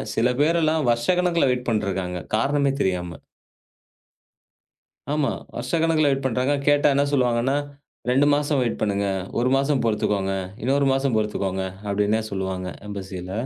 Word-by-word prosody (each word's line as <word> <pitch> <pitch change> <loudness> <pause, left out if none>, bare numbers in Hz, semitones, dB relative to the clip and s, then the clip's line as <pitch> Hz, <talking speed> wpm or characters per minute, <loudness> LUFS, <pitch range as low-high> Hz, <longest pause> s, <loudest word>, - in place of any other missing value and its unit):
சில 120 +2 +2
பேர் 165 +3 +3
எல்லாம் 155 -4 +1
வருஷக்கணக்குல 170 +5 +2
வெயிட் 125 0 -3
பண்ணிட்டு 105 -4 0
இருக்காங்க. 90 -2 -3 0.2
காரணமே 140 +3 +1
தெரியாம. 90 -2 -2 1.9
ஆமா. 150 -2 +1 0.2
வருஷக்கணக்குல 160 -2 +1
வெயிட் 135 0 0
பண்றாங்க. 130 +2 +1
கேட்டா 145 0 +4
என்ன 140 - +3
சொல்லுவாங்கன்னா, 125 0 +2 0.5
2 135 +3 +4
மாசம் 145 -1 +1
வெயிட் 120 - -1
பண்ணுங்க. 100 -1 0 0.3
1 125 +2 +2
மாசம் 135 0 +1
பொறுத்துக்கோங்க. 100 -3 0 0.3
இன்னொரு 140 +3 +2
மாசம் 135 -3 0
பொறுத்துக்கோங்க 100 -3 -1 0.2
அப்பிடின்னே 105 +2 +1
சொல்லுவாங்க 95 -1 -3 0.2
எம்பஸில 95 -2 -6
125 Hz, 130 wpm, -23 LUFS, 100-145 Hz, 1.9 s, கேட்டா